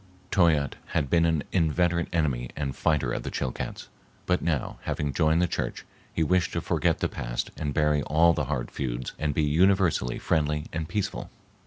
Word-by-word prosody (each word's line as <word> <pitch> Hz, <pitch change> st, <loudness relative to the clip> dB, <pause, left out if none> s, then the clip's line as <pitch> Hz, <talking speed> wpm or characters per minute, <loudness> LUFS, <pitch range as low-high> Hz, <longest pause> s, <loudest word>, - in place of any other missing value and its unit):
Toyatte 80 Hz, -7 st, +3 dB, 0.2 s
had 70 Hz, -4 st, 0 dB
been 85 Hz, -1 st, +4 dB
an 80 Hz, -4 st, +1 dB
inveterate 85 Hz, 0 st, +2 dB
enemy 70 Hz, -8 st, 0 dB
and 70 Hz, -3 st, -3 dB
fighter 70 Hz, -6 st, +1 dB
of -, -, -2 dB
the -, -, -5 dB
Chilcats, 65 Hz, -, -4 dB, 0.4 s
but 90 Hz, 0 st, +1 dB
now, 80 Hz, -6 st, -1 dB
having 70 Hz, -2 st, -2 dB
joined 80 Hz, +4 st, +3 dB
the -, -, +2 dB
church, -, -, -3 dB, 0.3 s
he 80 Hz, -, 0 dB
wished 90 Hz, +2 st, +1 dB
to -, -, 0 dB
forget -, -, +1 dB
the -, -, +2 dB
past -, -, -4 dB
and 75 Hz, -2 st, -3 dB
bury 75 Hz, 0 st, +2 dB
all 80 Hz, +4 st, +4 dB
the 75 Hz, -3 st, -1 dB
hard 60 Hz, -3 st, -3 dB
feuds 65 Hz, -2 st, -3 dB
and 75 Hz, -2 st, -1 dB
be 80 Hz, -, +2 dB
universally 85 Hz, -4 st, +3 dB
friendly 75 Hz, -1 st, 0 dB
and 80 Hz, -1 st, -3 dB
peaceful. 105 Hz, -3 st, -3 dB
75 Hz, 180 wpm, -27 LUFS, 70-85 Hz, 0.4 s, been